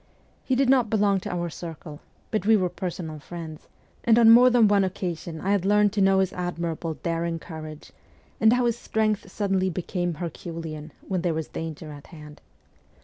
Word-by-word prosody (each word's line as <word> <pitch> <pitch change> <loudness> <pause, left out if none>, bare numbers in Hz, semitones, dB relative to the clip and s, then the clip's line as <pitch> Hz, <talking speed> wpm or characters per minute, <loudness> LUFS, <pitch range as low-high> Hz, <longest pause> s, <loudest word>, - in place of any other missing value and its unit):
He 260 - 0
did 270 +1 +2
not 255 -4 +4
belong 205 -2 +2
to - - -6
our 175 -1 -3
circle, 160 -2 -8 0.3
but 215 -2 -1
we 220 -1 +6
were 185 -2 0
personal 175 -3 -5
friends, 160 0 -9 0.4
and 230 -1 +4
on 230 -1 +8
more 245 +2 +8
than 240 -3 +5
one 200 -1 +4
occasion 175 -3 -4
I 195 - -1
had 200 -3 +2
learned 205 +1 +3
to 205 - 0
know 195 0 +4
his 190 -1 -1
admirable, 170 -2 -3
daring 165 0 -1
courage, 155 -2 -9 0.5
and 220 0 +5
how 245 0 +2
his 235 0 0
strength 215 -4 -1
suddenly 190 -2 0
became 175 0 -3
herculean 165 -2 -6 0.2
when 185 -2 -1
there 170 -2 0
was 160 -1 -3
danger 160 -1 -6
at 145 -1 -11
hand. 150 -2 -13
180 Hz, 185 wpm, -25 LUFS, 165-205 Hz, 0.5 s, on